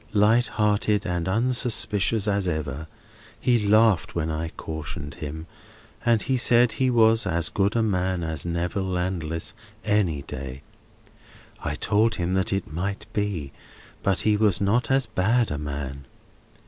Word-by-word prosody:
Light 110 +4 +4
hearted 105 -1 +1
and 90 -1 -2
unsuspicious 110 -2 +1
as 100 -2 0
ever. 80 -2 -3 0.5
He 120 -3 +2
laughed 110 -4 +3
when 80 -1 -1
I 80 +1 -3
cautioned 80 -2 -6
him, 80 -1 -7 0.6
and 120 -2 +3
said 125 -2 +4
he 130 -1 +1
was 115 -2 +4
as 85 -2 0
good 100 +2 0
a 115 - +2
man 90 -4 0
as 80 -2 -4
Neville 85 +3 -2
Landless 90 -3 -3 0.3
any 95 -9 +1
day. 65 +1 -7 1.0
I - - -3
told 110 +2 +2
him 90 -1 -2
that 95 0 0
might 100 +6 -4
be, 100 -10 -2 0.5
but 95 -2 +1
he 105 -1 +3
was 105 -4 +3
not 110 +5 +1
as 135 -1 +3
bad 110 +3 +1
a 75 - -3
man. 70 -2 -5
95 Hz, 140 wpm, -25 LUFS, 80-110 Hz, 1.0 s, Light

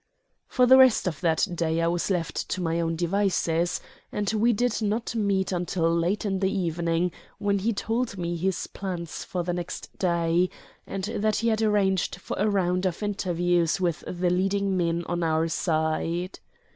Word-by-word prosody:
For 250 - +3
the 260 +1 +8
rest 260 -3 +6
of 165 -6 -3
that 165 +2 +2
day 165 -1 0
I 165 - +2
was 170 +2 0
left 175 -4 -2
to - - -2
my 165 -1 0
own 165 0 -1
devices, 175 -1 +1 0.3
and 210 0 -1
we 225 +2 +3
did 235 +1 0
not 220 +3 -1
meet 200 -4 0
until 175 -2 0
late 175 +6 0
in 195 -2 0
the 190 0 +1
evening, 170 -1 0 0.3
when 200 -1 0
he 220 +5 +1
told 225 +1 -2
me 175 -1 -2
his 185 +2 -1
plans 175 -4 -5
for 180 -1 -3
the 175 +1 -2
next 175 0 -6
day, 170 0 +2 0.4
and 195 -1 -4
that 215 0 0
he - - +4
had 220 0 +1
arranged 200 -4 +2
for - - -6
a 210 +2 +2
round 185 -2 +1
of 180 +3 -4
interviews 175 -4 +1
with 175 -3 -1
the 180 0 0
leading 195 +2 +1
men 170 -1 0
on 175 0 -2
our 160 0 +1
side. 165 +2 -1
180 Hz, 180 wpm, -26 LUFS, 170-200 Hz, 0.4 s, the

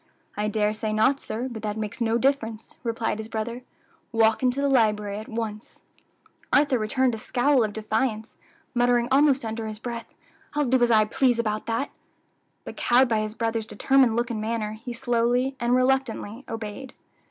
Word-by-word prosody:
"I 210 +1 -1
dare 210 0 +1
say 215 0 -3
not, 265 +6 +3
sir; 240 +1 -4
but 235 -4 -7
that 210 0 -3
makes 215 +2 -5
no 230 0 +2
difference," 230 -4 -1
replied 225 -2 -2
his 220 - -5
brother. 230 +2 -4 0.5
"Walk 225 -1 +3
into 255 +1 +1
the 280 - +2
library 210 -5 +2
at 215 - -9
once." 220 -1 -6 0.7
Arthur 280 -3 +4
returned 245 +4 +1
a 225 - -4
scowl 255 +3 +2
of 215 - -1
defiance, 220 +1 -2 0.4
muttering 245 -1 +2
almost 275 -2 +4
under 225 0 -4
his 215 -1 -6
breath, 235 0 -6 0.4
"I'll 295 -1 +2
do 255 0 +2
as 240 - +4
I 215 -2 +5
please 245 +2 +2
about 215 -2 -2
that;" 230 +5 -1 0.7
but - - -9
cowed 250 +1 +4
by 220 -2 +2
his 215 0 -3
brother's 225 -1 -2
determined 260 +1 +3
look 240 +1 0
and 215 -2 -3
manner, 220 -1 -2
he 225 +3 -8
slowly 245 +2 +1
and 240 +1 +2
reluctantly 255 -2 0
obeyed. 225 +3 -6
230 Hz, 175 wpm, -25 LUFS, 220-255 Hz, 0.7 s, I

